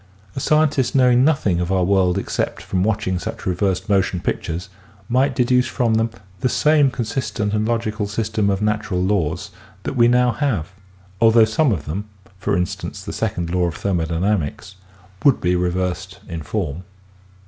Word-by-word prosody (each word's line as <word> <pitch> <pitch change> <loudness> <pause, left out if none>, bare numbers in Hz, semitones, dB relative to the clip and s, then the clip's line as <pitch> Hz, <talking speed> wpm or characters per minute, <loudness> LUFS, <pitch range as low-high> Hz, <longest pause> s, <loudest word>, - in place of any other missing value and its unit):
A - - -2
scientist 150 -2 +2
knowing 125 -1 +5
nothing 135 - +2
of 90 +1 -1
our 95 -1 +2
world 95 -1 +2
except 100 - -2
from 95 -1 -1
watching 105 -3 0
such - - -6
reversed 95 +2 0
motion 95 -3 +1
pictures 90 0 -3 0.4
might 130 +3 +2
deduce 125 0 +3
from 120 -3 0
them 115 +1 +2 0.3
the 125 - +1
same 150 +1 +4
consistent 115 -4 -2
and 110 0 0
logical 110 -3 -1
system 105 -1 -1
of 100 +1 0
natural 105 -3 0
laws 90 -5 -1 0.3
that - - -3
we 120 -1 +5
now 125 0 +4
have 115 - -1 0.5
although 115 0 +6
some 115 +6 +2
of 80 -9 -2
them, 100 +8 -5 0.3
for 95 - 0
instance, 90 -1 -4
the - - -6
second 85 -1 -2
law 90 0 +1
of 85 - -4
thermp 90 -5 -1
dynamics, 95 +2 -1 0.5
would 140 -3 +5
be 90 +1 +1
reversed 90 +2 -2
in 85 -2 -5
form. 85 -1 -3
105 Hz, 165 wpm, -21 LUFS, 90-120 Hz, 0.5 s, although